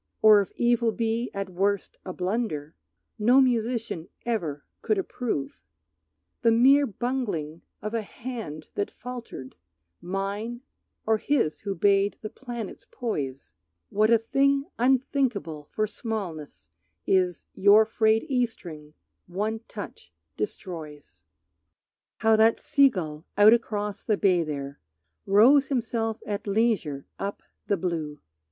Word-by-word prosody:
Or 215 Hz, -1 st, +8 dB
if 195 Hz, -, -6 dB
evil 235 Hz, -1 st, +2 dB
be 230 Hz, +1 st, -1 dB
at 195 Hz, -1 st, -4 dB
worst 195 Hz, +2 st, -1 dB
a 185 Hz, -, -5 dB
blunder 180 Hz, -6 st, -2 dB, 0.4 s
No 245 Hz, +5 st, +5 dB
musician 230 Hz, -8 st, 0 dB, 0.2 s
ever 165 Hz, -12 st, -2 dB, 0.2 s
could 430 Hz, -, +1 dB
approve, 245 Hz, -, -3 dB, 0.8 s
The 230 Hz, -, +4 dB
mere 270 Hz, +5 st, +5 dB
bungling 200 Hz, -, -3 dB, 0.2 s
of 215 Hz, +1 st, -4 dB
a 230 Hz, -, 0 dB
hand 220 Hz, -8 st, -7 dB
that 205 Hz, -, -2 dB
faltered, 235 Hz, -, -8 dB, 0.5 s
Mine 200 Hz, +6 st, -3 dB, 0.4 s
or 220 Hz, 0 st, +2 dB
his 245 Hz, -, 0 dB
who 200 Hz, -2 st, -4 dB
bade 200 Hz, +2 st, +3 dB
the 215 Hz, -, -5 dB
planets 240 Hz, -5 st, -7 dB
poise, 140 Hz, -, -4 dB, 0.4 s
What 215 Hz, +2 st, +3 dB
a 230 Hz, -, +6 dB
thing 275 Hz, +5 st, +2 dB
unthinkable 250 Hz, -, +1 dB
for 215 Hz, -, 0 dB
smallness 180 Hz, -, -6 dB, 0.3 s
Is 180 Hz, -3 st, +1 dB
your 205 Hz, +3 st, +6 dB
frayed 220 Hz, 0 st, +2 dB
E 250 Hz, -3 st, +2 dB
string 155 Hz, -9 st, -12 dB, 0.3 s
one 210 Hz, +5 st, -2 dB
touch 205 Hz, -, -9 dB, 0.2 s
destroys. 150 Hz, -, -7 dB, 0.9 s
How 220 Hz, 0 st, +4 dB
that 225 Hz, +1 st, +4 dB
sea 285 Hz, -2 st, +4 dB
gull 160 Hz, -7 st, -6 dB
out 210 Hz, +2 st, +8 dB
across 210 Hz, -3 st, -2 dB
the 215 Hz, -3 st, +1 dB
bay 185 Hz, -4 st, +3 dB
there 140 Hz, -3 st, -5 dB, 0.5 s
Rows 250 Hz, +8 st, +6 dB
himself 225 Hz, -4 st, -2 dB
at 205 Hz, 0 st, -4 dB
leisure 200 Hz, -10 st, 0 dB
up 200 Hz, +1 st, -4 dB, 0.2 s
the 200 Hz, -, +2 dB
blue! 160 Hz, -4 st, -3 dB
210 Hz, 125 wpm, -26 LUFS, 175-235 Hz, 0.9 s, Or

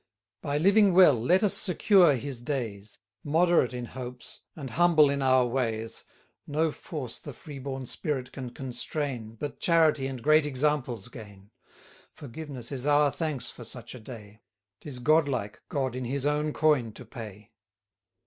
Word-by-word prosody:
By 145 Hz, 0 st, -1 dB
living 200 Hz, +4 st, +5 dB
well, 180 Hz, -5 st, +8 dB
let 165 Hz, -, +2 dB
us 205 Hz, -, +3 dB
secure 180 Hz, -4 st, +4 dB
his 130 Hz, -1 st, -5 dB
days; 110 Hz, -6 st, -4 dB, 0.3 s
Moderate 165 Hz, -4 st, +3 dB
in 125 Hz, -1 st, -5 dB
hopes, 125 Hz, 0 st, -7 dB
and 140 Hz, -6 st, -7 dB
humble 160 Hz, -2 st, +5 dB
in 140 Hz, 0 st, -1 dB
our 130 Hz, -1 st, +4 dB
ways, 115 Hz, -3 st, -2 dB, 0.4 s
300 150 Hz, +2 st, 0 dB
No 160 Hz, -, 0 dB
force 140 Hz, -6 st, -7 dB
the 145 Hz, -, -9 dB
free 140 Hz, +3 st, -10 dB
born 135 Hz, -1 st, -5 dB
spirit 130 Hz, 0 st, -3 dB
can 130 Hz, -2 st, -6 dB
constrain, 125 Hz, -2 st, -4 dB
But 145 Hz, +6 st, -6 dB
charity 160 Hz, -5 st, +3 dB
and 130 Hz, -3 st, -6 dB
great 155 Hz, 0 st, +4 dB
examples 130 Hz, -6 st, -1 dB
gain. 105 Hz, -4 st, -12 dB, 0.6 s
Forgiveness 140 Hz, -2 st, -8 dB
is 135 Hz, 0 st, -3 dB
our 145 Hz, -1 st, +4 dB
thanks 150 Hz, -7 st, -3 dB
for 120 Hz, -, -11 dB
such 120 Hz, 0 st, -8 dB
a 125 Hz, -, -9 dB
day: 110 Hz, -2 st, -11 dB, 0.4 s
'Tis 140 Hz, -4 st, -6 dB
god 155 Hz, +4 st, +3 dB
like 105 Hz, -6 st, -4 dB
God 130 Hz, -3 st, -1 dB
in 130 Hz, -1 st, -4 dB
his 135 Hz, +3 st, -2 dB
own 150 Hz, +1 st, +1 dB
coin 145 Hz, -8 st, +2 dB
to 125 Hz, -, -11 dB
pay. 105 Hz, -3 st, -10 dB
135 Hz, 160 wpm, -28 LUFS, 120-150 Hz, 0.6 s, well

